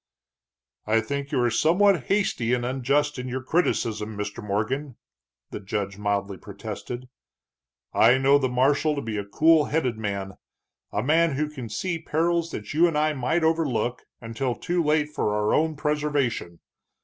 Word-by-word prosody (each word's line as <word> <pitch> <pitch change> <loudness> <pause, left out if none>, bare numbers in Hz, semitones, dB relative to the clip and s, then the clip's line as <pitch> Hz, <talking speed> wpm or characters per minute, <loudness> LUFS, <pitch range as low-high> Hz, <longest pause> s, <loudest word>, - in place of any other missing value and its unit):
"I 110 +1 +3
think 140 +5 -4
you 140 - +1
are 120 - +2
somewhat 175 - +3
hasty 125 - +1
and 120 -1 -3
unjust 135 +3 0
in 125 - -5
your 130 +1 -4
criticism, 110 -9 -1
Mr. 105 0 -5
Morgan," 110 +7 -2 0.6
the - - -5
judge 100 0 -4
mildly 100 -1 -1
protested. 110 +5 -7 0.9
"I 120 +3 +5
know 135 +2 +4
the 130 -2 0
marshal 140 +5 +2
to 140 - -3
be 110 -2 -3
a 100 - -2
cool 155 +9 +4
headed 130 -8 -1
man, 100 -3 -4 0.5
a 105 - -1
man 160 +3 +3
who 150 +2 0
can 135 -6 -8
see 165 - -2
perils 165 +1 0
that 105 -7 -6
you 165 +4 +5
and 165 -3 -1
I 155 0 +2
might 150 +5 0
overlook 135 -7 0 0.2
until 120 +2 -3
too 175 0 -1
late 150 0 +2
for 105 -6 0
our 105 0 +1
own 160 0 +2
preservation. 145 - -1
130 Hz, 160 wpm, -25 LUFS, 110-155 Hz, 0.9 s, I